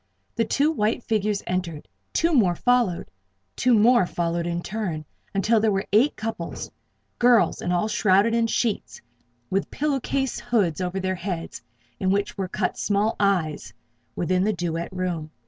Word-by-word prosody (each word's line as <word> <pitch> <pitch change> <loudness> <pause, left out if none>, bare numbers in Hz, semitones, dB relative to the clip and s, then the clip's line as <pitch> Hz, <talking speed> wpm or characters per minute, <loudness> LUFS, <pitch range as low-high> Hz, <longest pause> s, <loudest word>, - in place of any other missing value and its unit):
The 230 - +1
two 290 +7 +2
white 220 -5 0
figures 210 -2 0
entered; 175 - -3 0.2
two 335 +1 +1
more 195 -11 +4
followed; 245 -5 +1 0.4
two 250 -1 +3
more 225 -2 +5
followed 170 0 -2
in 175 0 -2
turn, 185 -8 -4 0.3
until 215 +3 +2
there 215 0 +2
were 195 0 -1
eight 250 +8 +4
couples 215 -6 -5 0.5
girls 240 -2 +4
and 175 - -2
all 180 +4 +1
shrouded 210 +1 +3
in 230 0 +2
sheets, 225 -2 -1 0.5
with 195 +1 0
pillow 290 -1 -1
case 270 0 -2
hoods 190 -8 0
over 180 +1 -2
their 185 0 -1
heads, 180 -2 -5 0.4
in 190 - 0
which 200 +1 0
were 195 -2 -3
cut 185 0 -2
small 210 +2 +1
"eyes" 180 -7 0 0.4
within 180 +2 +1
the 215 +2 +1
duet 170 -1 -3
room. 180 -4 -3
200 Hz, 160 wpm, -24 LUFS, 175-225 Hz, 0.5 s, more